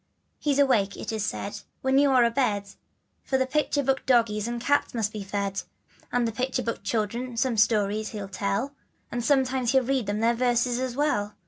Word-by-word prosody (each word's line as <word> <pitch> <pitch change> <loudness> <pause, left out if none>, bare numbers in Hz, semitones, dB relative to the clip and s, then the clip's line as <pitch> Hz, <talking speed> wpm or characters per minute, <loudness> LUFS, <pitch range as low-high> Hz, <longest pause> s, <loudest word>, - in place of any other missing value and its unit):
He's 285 -2 0
awake 235 -9 +3
it - - -5
is 220 -2 -2
said 205 -1 -4 0.2
when 265 +1 +3
you 285 0 +4
are 255 -2 +5
abed, 230 -4 +1 0.5
For 265 - 0
the 260 - +2
picture 290 +1 0
book 270 0 0
doggies 230 -4 +2
and 240 0 -3
cats 285 +1 +1
must 215 -2 -1
be 210 -2 -5
fed, 200 0 -2 0.5
To 245 -1 +1
the 225 - -1
picture 255 +2 -2
book 230 - -3
children 235 +3 -2
some 245 0 +1
stories 215 0 +2
he'll 205 -3 -6
tell, 200 +7 -2 0.4
And 240 0 -2
sometimes 260 -2 +2
he'll 265 -1 +4
read 260 -3 0
them 205 +1 -1
their 230 +1 +3
verses 245 0 +1
as 255 -2 -3
well. 210 -8 0
235 Hz, 195 wpm, -26 LUFS, 210-260 Hz, 0.5 s, are